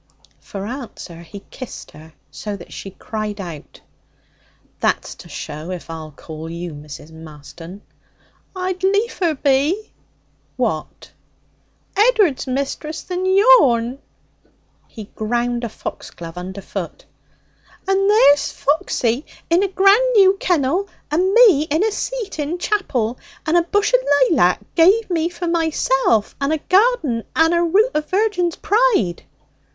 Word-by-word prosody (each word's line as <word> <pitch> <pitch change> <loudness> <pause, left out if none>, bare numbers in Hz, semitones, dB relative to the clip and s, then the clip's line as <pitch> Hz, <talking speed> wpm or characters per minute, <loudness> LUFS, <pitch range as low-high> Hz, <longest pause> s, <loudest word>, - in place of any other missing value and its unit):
For 200 -1 -7
answer, 235 -8 -8
he 195 +4 -11
kissed 255 -3 -9
her 155 +1 -15 0.2
so 210 -1 -6
that - - -12
she 195 - -7
cried 215 +1 -5
out. 170 -6 -9 1.0
'That's - - 0
to - - -14
show 155 +3 -7
if 180 -2 -6
I'll 160 -1 -7
call 155 +2 -9
you 170 0 -6
Mrs. 150 +1 -11
Marston.' 160 +4 -12 0.7
'I'd 370 0 -3
liefer 385 -4 +1
be.' 285 +10 +1 0.7
'What?' - - -3 0.8
'Ed'ard's 415 - +3
missus 280 +4 -3
than 365 0 -3
yourn.' 285 - +4 0.9
He 220 - -9
ground 240 +2 -1
a 235 - -2
foxglove 170 -5 -8
underfoot. 190 +2 -7 0.8
'And 390 +1 +2
there's 290 -10 +5
Foxy 270 -3 0 0.3
in 345 +2 +4
a 400 - +2
grand 395 +6 +4
new 390 -2 +6
kennel, 350 +3 0 0.2
and 360 +5 +2
me 395 - +6
in 315 +6 +1
a 440 - +1
seat 440 -4 -4
in 300 +4 -2
chapel, 265 - -1 0.3
and 320 - +1
a 345 - +6
bush 410 +7 0
o' - - +1 0.3
laylac 195 - +3
give 380 +5 +4
me 335 -1 +1
for 350 0 -6
myself, 310 -9 +1
and 275 +2 +1
a 315 - +1
garden 365 - +2
and 325 +1 +4
a 340 - +2
root 395 +8 +3
o' 300 - +1
virgin's 370 -1 0
pride.' 420 - +1
300 Hz, 130 wpm, -20 LUFS, -, 1.0 s, new